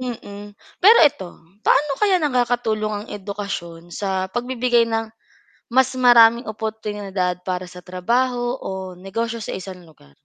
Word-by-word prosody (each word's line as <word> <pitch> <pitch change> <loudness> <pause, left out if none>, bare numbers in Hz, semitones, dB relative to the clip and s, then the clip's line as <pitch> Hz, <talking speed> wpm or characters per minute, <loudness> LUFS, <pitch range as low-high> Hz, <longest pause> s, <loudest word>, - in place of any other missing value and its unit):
Mm, 205 -5 -7 0.3
pero 435 +6 +8
ito, 285 -11 +1 0.3
paano 290 +4 +2
kaya 400 -3 +4
nakakatulong 245 -7 0
ang - - -16
edukasyon 190 -4 -6
sa 190 -2 -2
pagbibigay 240 -1 +1
ng 225 0 -1 0.7
mas 260 +1 +4
maraming 235 -1 +6
oportunidad 205 -4 -3
para 185 0 -3
sa 180 0 -12
trabaho 240 +7 -1
o 190 -1 -5
negosyo 225 +6 -4
sa - - -5
1 185 -1 -8
lugar? 70 - -21
215 Hz, 130 wpm, -21 LUFS, 190-245 Hz, 0.7 s, pero